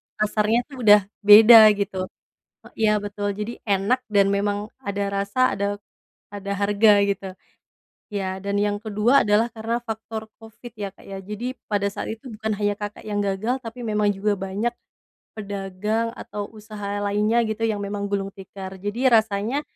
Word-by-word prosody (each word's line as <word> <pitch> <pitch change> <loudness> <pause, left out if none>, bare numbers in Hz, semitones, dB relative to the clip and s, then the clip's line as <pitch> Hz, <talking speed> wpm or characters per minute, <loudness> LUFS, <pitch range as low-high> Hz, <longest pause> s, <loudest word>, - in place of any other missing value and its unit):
pasarnya 215 +1 +1
itu 285 - -18
udah 210 -3 +7 0.2
beda, 215 +3 +9 0.2
gitu. 195 -2 -3 0.6
E - - -12 0.2
iya 210 - +4
betul, 205 0 -3
jadi 210 +2 -4 0.2
enak 200 +6 +2
dan 200 -2 +3
memang 205 0 0 0.2
ada 200 -4 -3
rasa 200 +6 +1
ada 200 0 -2 0.6
ada 200 -1 -5
harga, 205 +2 +4 0.2
gitu. 195 -1 -2 0.9
Ya, 190 -1 -2
dan 200 0 -1
yang 205 0 0
kedua, 220 +6 +3
adalah 210 +3 +3
karena 225 +1 -2
faktor 220 -1 -6
Covid 225 +2 -13
ya 200 -1 -4
Kak - - -19
ya. 195 0 -7
Jadi 220 +6 -5
pada 200 -1 +1
saat - - -6
itu 225 +4 -19
bukan 220 0 -3
hanya 205 -1 +1
Kakak 205 0 -6
yang 205 -1 -2
gagal, 200 +6 -1
tapi 230 +2 -8
memang 210 -1 +1
juga 205 +2 0
banyak 200 +6 -2 0.6
pedagang 205 +2 -3
atau 205 -1 -6
usaha 210 -2 -6
lainnya 210 +3 +1
gitu 220 +1 -4
yang 215 -2 -1
memang 200 0 -3
gulung 195 -1 -2
tikar. 190 -1 -9
Jadi 215 +7 0
rasanya 225 +4 +2
210 Hz, 160 wpm, -23 LUFS, 200-220 Hz, 0.9 s, beda